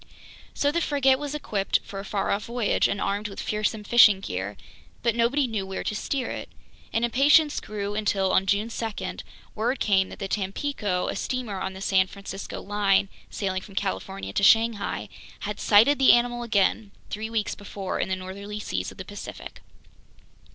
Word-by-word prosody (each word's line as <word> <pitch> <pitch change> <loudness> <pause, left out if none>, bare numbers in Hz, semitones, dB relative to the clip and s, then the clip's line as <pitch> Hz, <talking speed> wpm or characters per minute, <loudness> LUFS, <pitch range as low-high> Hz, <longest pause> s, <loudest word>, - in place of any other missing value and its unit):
So 285 - +2
the 340 +2 0
frigate 270 -3 +3
was 290 0 -4
equipped 205 -9 0
for 195 - -7
a - - -5
far 195 0 -1
off 200 +1 -1
voyage 235 -3 +1
and 200 - -2
armed 205 +2 -1
with 195 - -9
fearsome 215 0 -1
fishing 210 -3 +7
gear, 95 - -4 0.5
but 235 -1 +3
nobody 245 +5 +2
knew 220 -5 -2
where 190 0 -5
to - - -2
steer 260 +4 -2
it. - - -6 0.4
And 230 +1 +1
impatience 285 +5 +4
grew 205 -1 -4
until, 200 -2 +1
on 195 - +2
June 205 +4 +1
2, 225 -2 -4 0.4
word 240 +5 -1
came 190 -2 +2
that - - -9
the 195 - -4
Tampico, 200 -1 -2
a - - -2
steamer 225 -3 -3
on 190 - -3
the 190 - -9
San 190 -1 +3
Francisco 195 0 -7
line 200 -1 +2 0.2
sailing 190 -2 -2
from 195 0 -13
California 95 - -3
to - - +1
Shanghai, 225 0 +3 0.3
had 210 0 -4
sighted 230 +8 +5
the 265 - +8
animal 240 0 +2
again, 215 -2 +1 0.2
three 220 +1 -3
weeks 225 -2 -1
before 200 -1 -5
in - - -1
the 190 - +1
northerly 200 +3 -7
seas 90 - -3
of - - -15
the 190 - -7
Pacific. 205 +1 -9
205 Hz, 180 wpm, -26 LUFS, 195-235 Hz, 0.5 s, the